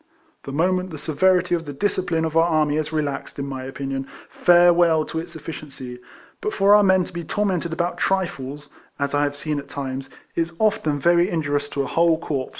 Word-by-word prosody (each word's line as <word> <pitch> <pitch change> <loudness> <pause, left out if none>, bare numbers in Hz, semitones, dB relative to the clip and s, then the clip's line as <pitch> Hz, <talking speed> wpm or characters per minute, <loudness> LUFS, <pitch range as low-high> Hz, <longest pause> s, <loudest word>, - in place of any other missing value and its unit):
Tlie 135 - -6
moment 185 +3 +1
the 160 - -7
severity 180 +5 +2
of 165 -1 0
the 145 - -5
discipline 180 -1 0
of 160 0 -4
our 165 +1 +5
army 155 -2 +2
is 155 0 -2
relaxed, 145 -3 -3
in 140 - -3
my 135 -2 -5
opinion, 135 0 -4 0.2
farewell 175 -2 +5
to 160 - -4
its 170 +1 -8
efficiency; 140 -5 -8 0.4
but 425 - -2
for 200 +1 +4
our 210 - +7
men 190 -2 +4
to 175 - -10
be 170 0 -4
tormented 180 -1 -1
about 175 +1 -2
trifles 145 -7 -2 0.3
(as 140 0 -2
I 145 - +2
have 145 -1 0
seen 150 0 -3
at 140 - -10
times) 135 -1 -5 0.3
is 165 0 -1
often 165 -8 +1
very 175 +4 +4
injurious 145 -3 -1
to 140 - 0
a - - -3
whole 165 +4 +3
corps. 140 -5 -3
160 Hz, 200 wpm, -22 LUFS, 145-175 Hz, 0.4 s, our